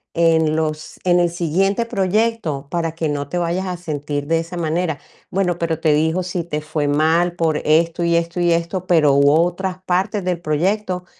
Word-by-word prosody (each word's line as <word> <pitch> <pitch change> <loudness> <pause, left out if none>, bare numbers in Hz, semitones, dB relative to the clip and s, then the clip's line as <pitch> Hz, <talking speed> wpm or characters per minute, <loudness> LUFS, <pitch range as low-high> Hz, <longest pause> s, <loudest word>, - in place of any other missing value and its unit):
en 160 -2 +3
los 155 -1 -3
en 175 -1 +4
el 175 - +2
siguiente 185 +6 0
proyecto, 195 -8 -1
para 165 -1 -2
que 165 -1 -1
no 145 -1 -3
te 180 - -3
vayas 175 +2 -1
a 180 -1 -3
sentir 145 -4 -4
de 165 +1 +2
esa 165 +2 -6
manera. 165 -1 -1 0.3
Bueno, 180 -2 0
pero, 165 -1 -1
te 155 -2 +3
dijo 160 +4 +1
si 180 -1 -3
te 150 -3 -3
fue 150 -1 -2
mal 160 +4 +2
por 160 -2 +1
esto, 165 +2 +2
y 170 0 +2
esto 170 +1 -2
y 175 0 +3
esto, 170 +2 -1
pero 155 -5 +4
hubo 140 +3 +5
otras 185 +1 -3
partes 190 +3 0
del 180 -2 -1
proyecto, 180 +4 -1
170 Hz, 195 wpm, -20 LUFS, 155-180 Hz, 0.3 s, hubo